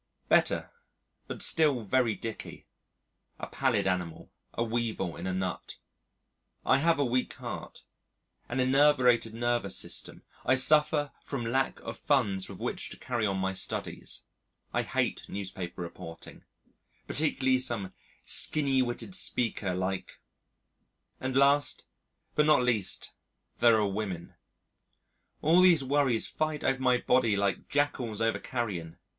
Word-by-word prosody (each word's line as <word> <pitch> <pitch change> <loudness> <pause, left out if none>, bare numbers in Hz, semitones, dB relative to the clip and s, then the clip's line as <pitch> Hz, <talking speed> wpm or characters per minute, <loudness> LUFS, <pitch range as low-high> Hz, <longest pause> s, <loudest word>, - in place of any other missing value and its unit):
Better, - - +2 0.6
but - - -3
still 145 -7 +3
very 115 0 +2
dicky: 115 -2 -7 0.7
a - - -5
pallid 125 -7 0
animal: 90 -3 -3 0.2
a 115 - 0
weevil 115 -7 -2
in 95 - -6
a - - -1
nut. 95 0 -4 0.9
I 130 - +4
have 165 +3 +3
a 145 - +2
weak 125 +1 0
heart, - - -8 0.7
an 125 - -2
enervated 130 -4 +4
nervous 120 -4 0
system; - - -2 0.2
I 130 - +3
suffer 150 +2 +4
from 130 -4 -4
lack 130 +4 0
of - - -7
funds 105 -10 +1
with - - -8
which - - -3
to - - -8
carry 120 -4 -1
on 95 -1 -1
my 95 0 -1
studies; 95 - -2 0.5
I - - +2
hate - - -2
newspaper 95 -3 -5
reporting 80 -1 -10 0.6
particularly 130 -4 +1
some 120 -7 -1 0.3
skinny 135 -3 +1
witted 125 +9 -3
speaker 115 - 0
like; 95 +1 -3 1.0
and 130 0 -3
last, 140 +1 +3 0.5
but 150 0 +3
not 150 -4 +5
least, 110 -6 0 0.5
there 115 -2 +5
are 105 - +2
women; 95 -4 -4 1.1
all 165 +4 +5
these 175 -6 +6
worries 135 -4 +2
fight 155 -1 -2
over 135 - +1
my 125 -1 +3
body 125 -4 +2
like 100 -1 -1
jackals 135 -7 -1
over 115 0 +1
carrion. 95 -9 -4
120 Hz, 130 wpm, -29 LUFS, 100-135 Hz, 1.1 s, these